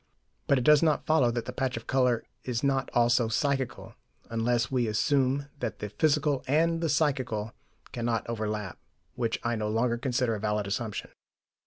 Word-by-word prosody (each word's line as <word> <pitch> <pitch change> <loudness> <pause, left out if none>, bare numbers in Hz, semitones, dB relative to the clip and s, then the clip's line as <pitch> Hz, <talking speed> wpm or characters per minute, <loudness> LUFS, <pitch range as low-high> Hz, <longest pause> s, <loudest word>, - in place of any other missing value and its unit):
But 140 - +4
it 125 - 0
does 150 +2 +6
not 155 -3 +2
follow 155 -6 +3
that 120 0 -2
the 125 - -6
patch 130 -2 -1
of 115 - -7
colour 125 -3 +2 0.2
is 125 -1 -2
not 135 -2 +1
also 120 0 +4
psychical, 135 +2 -1 0.4
unless 115 +1 0
we 125 -3 +1
assume 135 +5 +1
that 110 -6 -3
the 105 - -5
physical 145 +4 +1
and 165 +4 +2
the 165 - 0
psychical 130 -8 0 0.4
cannot 115 -1 -2
overlap, 105 -4 -3 0.3
which 115 -2 -1
I 120 0 0
no 105 -1 -2
longer 115 +2 +1
consider 125 -2 0
a 105 - -3
valid 105 0 -1
assumption. 105 +1 -4
120 Hz, 170 wpm, -28 LUFS, 115-135 Hz, 0.4 s, does